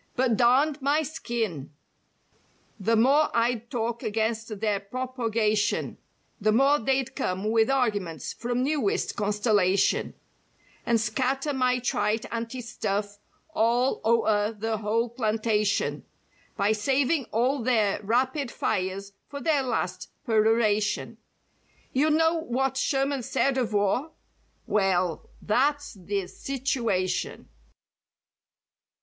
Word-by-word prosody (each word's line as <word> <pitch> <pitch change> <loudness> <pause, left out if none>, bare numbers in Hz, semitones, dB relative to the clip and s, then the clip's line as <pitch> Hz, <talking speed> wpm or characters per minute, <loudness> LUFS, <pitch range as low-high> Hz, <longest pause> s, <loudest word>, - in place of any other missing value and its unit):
"But 250 -2 +2
darned 270 +6 +3
my 290 +3 +2
skin! 225 - -4 1.0
The 225 +4 +2
more 275 +7 +4
I'd 235 0 0
talk 235 -2 -2
against 220 0 -2
their 210 -2 0
propogation 225 -2 -1 0.4
"The 215 0 +2
more 275 +6 +4
they'd 265 +2 -1
come 190 +4 -2
with 225 +1 +3
arguments 205 - -1
from 245 +1 -2
newest 280 -7 0
constellation 205 -2 +1 0.7
"And 235 -1 +3
scatter 260 +6 -1
my 255 -1 +2
trite 220 -3 -1
anti 230 +2 -4
stuff 205 -3 -3 0.3
all 240 -1 +1
o'er 220 -2 +2
the 220 +1 -2
whole 220 +3 0
plantation, 215 -3 0 0.5
"By 200 0 +2
saving 270 +6 +1
all 250 +5 0
their 220 -4 +1
'rapid 255 +5 0
fires' 195 -1 -2
for 280 - -7
their 305 -2 +2
last 185 -8 -3 0.2
per¬ 220 -1 +3
oration. 215 -2 +1 0.8
"You 290 +4 +3
know 325 +2 +3
what 265 -2 -1
Sherman 270 0 0
said 260 +2 0
of 250 -4 -1
war? 210 +9 0 0.5
Well, 185 -4 0
that's 285 +7 +1
the 195 0 -3
situation." 240 -7 -2
230 Hz, 110 wpm, -26 LUFS, 210-265 Hz, 1.0 s, more